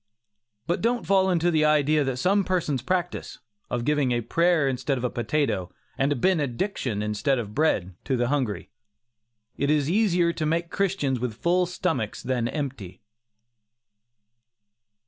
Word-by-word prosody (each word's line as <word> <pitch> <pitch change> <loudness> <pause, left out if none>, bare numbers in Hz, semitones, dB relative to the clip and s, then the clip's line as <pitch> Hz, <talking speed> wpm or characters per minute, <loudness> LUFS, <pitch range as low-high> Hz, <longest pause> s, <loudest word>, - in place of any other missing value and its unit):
But 175 - -1
don't 240 +1 0
fall 190 -1 +3
into 175 -1 +2
the 155 -2 +2
idea 150 0 +3
that 135 -2 -2
some 195 +8 +2
persons 170 -8 -1
practise, 180 +6 -2 0.3
of 120 -1 -2
giving 145 -3 +2
a 120 0 +1
prayer 165 +5 +2
instead 135 +1 -1
of 125 - -5
a 125 - 0
potato, 120 -6 -1 0.2
and 135 +2 +1
a - - +2
benediction 140 - 0
instead 105 +6 0
of 105 -4 -5
bread, 105 - +1
to 130 - 0
the 120 0 0
hungry. 110 - -2 0.9
It 140 - 0
is 150 0 +2
easier 180 -5 +2
to 165 - -4
make 170 +2 -1
Christians 180 -10 0
with 120 -2 -3
full 180 +1 +2
stomachs 165 - -2
than 125 -2 0
empty. 130 - -5
145 Hz, 150 wpm, -25 LUFS, 125-175 Hz, 0.9 s, fall